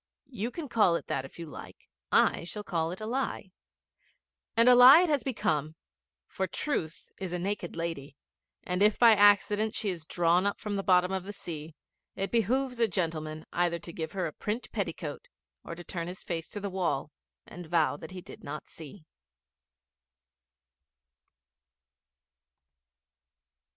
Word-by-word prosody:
'You 230 -1 -3
can 310 +3 -6
call 210 -8 +3
it - - -3
that 135 - -1
if 135 - -13
you 170 - -6
like. 150 - -11 0.2
I - - +3
shall 210 +5 -7
call 165 -4 -1
it 180 - -7
a - - -4
lie.' 235 -5 -3 1.1
And 230 +1 +6
a 250 - +9
lie 255 +6 +10
it 360 - +1
has 290 -3 +2
become; 155 - -1 0.5
for 190 - -3
Truth 170 - -4
is 190 -2 -4
a - - 0
naked 185 -1 -3
lady, 165 -4 -5 0.5
and 180 +1 -2
if 210 +1 +4
by 235 -2 +7
accident 205 +1 +4
she 205 - -1
is 165 -3 -7
drawn 175 +2 +2
up 200 - -2
from 210 -2 -4
the 200 - -1
bottom 180 -1 +3
of 190 -1 -2
the 205 - -5
sea, 160 -5 -8 0.4
it 195 +1 -3
behoves 250 +3 0
a 230 - +4
gentleman 160 -4 -3
either 175 -1 +1
to 170 0 -10
give 160 +2 -5
her 185 -2 -1
a 155 - -4
print 215 +4 -4
petticoat - - -4 0.4
or - - -7
to 175 - -10
turn 170 -1 -5
his 180 +1 -7
face 165 -2 -4
to 205 - -5
the 200 -1 -4
wall 165 -6 -1 0.3
and 175 -1 -10
vow 160 -3 +2
that 155 +2 -10
he 185 -1 -8
did - - -12
not 150 +2 -7
see. 160 +1 -11
185 Hz, 165 wpm, -29 LUFS, 165-210 Hz, 1.1 s, lie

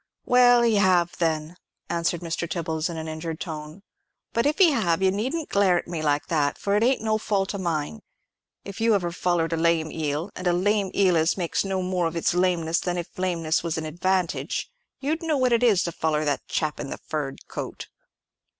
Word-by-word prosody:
"Well, 245 -1 +6
he 230 -3 +3
have, 180 -3 +3
then," 160 0 -1 0.3
answered 170 0 -1
Mr. 170 0 -3
Tibbles, 160 -2 -2
in 170 - -5
an 160 0 -5
injured 160 +1 -5
tone; 155 +2 -7 0.5
"but 235 +4 +2
if 300 - 0
he 365 -5 +6
have, 190 - +1
you 190 - +4
needn't 265 - -2
glare 195 -3 +3
at - - -4
me 170 -2 -4
like 145 -1 +1
that, 145 -4 0
for 200 0 0
it 210 - +2
ain't 250 0 +2
no 220 -1 +1
fault 200 -2 -1
of 200 - -4
mine. 155 - -2 0.6
If 200 +2 -7
you 225 -1 +4
ever 175 -3 -1
follered 170 -2 0
a - - 0
lame 165 -1 +1
eel—and 160 +4 -3
a 175 - +3
lame 200 +2 +1
eel 185 -3 +4
as 160 +2 +2
makes 175 -3 0
no 190 -1 -2
more 180 -2 0
of 165 - -5
its 165 - +1
lameness 175 -2 +1
than 180 -1 -2
if 175 0 -6
lameness 170 -4 0
was 165 -2 -2
a 160 - -3
advantage—you'd 185 - -2
know 320 -3 0
what 255 -2 +2
it 235 - +3
is 220 -7 +4
to 170 - -2
foller 155 -1 -1
that 145 -2 -1
chap 155 -2 -2
in - - -5
the - - -5
furred 145 -3 -5
coat." - - -6
175 Hz, 205 wpm, -25 LUFS, 160-200 Hz, 0.6 s, Well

